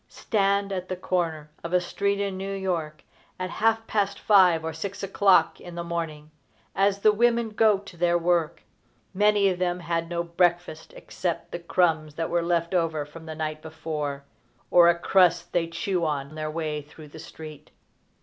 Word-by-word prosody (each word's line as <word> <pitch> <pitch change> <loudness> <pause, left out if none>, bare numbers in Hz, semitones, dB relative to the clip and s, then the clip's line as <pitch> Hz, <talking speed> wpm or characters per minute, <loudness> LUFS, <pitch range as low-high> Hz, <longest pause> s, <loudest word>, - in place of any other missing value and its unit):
Stand 200 -1 0
at 185 -1 -4
the 185 - -2
corner 165 -4 -2
of 170 +1 -5
a 180 - +5
street 200 +3 -1
in 200 -1 -2
New 195 +1 -4
York 170 -6 -3 0.3
at 185 0 -4
half 225 0 +1
past 200 -2 -1
five 180 -6 +4
or 160 - -3
six 195 +6 -6
o'clock 195 0 +3
in 175 -1 -10
the 170 - -4
morning, 160 -3 -5 0.4
as 195 +1 +2
the 215 - +6
women 235 +1 +2
go 215 -1 +4
to 195 -2 -13
their 175 0 +2
work. 170 -1 0 0.5
Many 205 0 +3
of 180 -1 -3
them 180 0 -1
had 170 -1 -2
no 170 -1 -1
breakfast 175 -1 0
except 170 -2 -4
the 175 - -4
crumbs 160 -3 0
that 165 0 -3
were 175 - +2
left 170 0 0
over 165 -4 0
from 160 +2 -12
the 160 - -6
night 155 0 -4
before, 150 -3 -5 0.5
or 170 -1 +7
a 170 - +3
crust 175 -1 +2
they 170 -2 +1
chew 170 +2 -2
on 145 -2 -2
their 155 0 -4
way 155 -1 -3
through 150 +1 -14
the 160 - -12
street. 155 -2 -11
175 Hz, 180 wpm, -25 LUFS, 160-195 Hz, 0.5 s, or